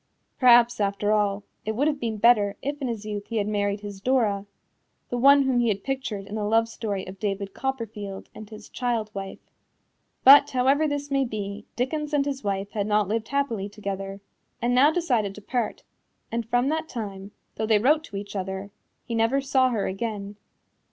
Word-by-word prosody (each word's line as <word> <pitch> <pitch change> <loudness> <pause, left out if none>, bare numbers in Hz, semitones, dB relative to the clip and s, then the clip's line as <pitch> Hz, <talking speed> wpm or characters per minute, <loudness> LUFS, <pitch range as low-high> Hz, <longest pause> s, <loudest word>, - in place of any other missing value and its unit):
Perhaps, 240 -2 +6
after 200 +1 0
all, 205 -1 +1 0.2
it 220 0 -3
would 285 +6 +2
have 295 -2 0
been 225 -3 -2
better 205 -2 +4
if 285 +1 -3
in 265 - -1
his 225 -3 -4
youth 205 -1 -5
he 230 - -3
had 205 -1 0
married 205 -1 -1
his 205 -2 -8
Dora 210 -5 +1 0.6
the 245 - -2
one 280 +2 +7
whom 260 -2 +2
he 240 - +2
had 200 -3 -1
pictured 260 -7 -3
in 205 - -10
the 215 -1 -2
love 225 +2 +3
story 205 -4 -4
of 190 +1 -10
David 200 -1 -3
Copperfield 220 -7 -5
and 215 -1 -10
his 215 -1 -11
child 235 -4 -2
wife. 195 -1 -6 0.9
But, 275 +2 +9
however 270 +4 +2
this 285 -1 -3
may 275 0 +2
be, 210 -3 -5
Dickens 300 +4 -2
and 280 -1 +2
his 275 -1 -3
wife 200 0 -2
had 205 -2 -2
not 210 -2 +2
lived 220 0 -1
happily 235 -8 -1
together, 195 -1 -5 0.4
and 245 0 0
now 265 +4 +6
decided 245 - 0
to 210 - -10
part, 240 -1 -2 0.5
and 230 -1 -3
from 245 +3 +2
that 315 +1 -2
time, 200 -4 -6 0.3
though 220 - -1
they 220 -1 +5
wrote 295 +8 +3
to 200 - -11
each 200 +1 -6
other, 190 +1 -4 0.3
he 235 - -5
never 230 +4 +2
saw 265 -1 +2
her 220 -5 -1
again. 205 0 -4
220 Hz, 195 wpm, -25 LUFS, 200-255 Hz, 0.9 s, But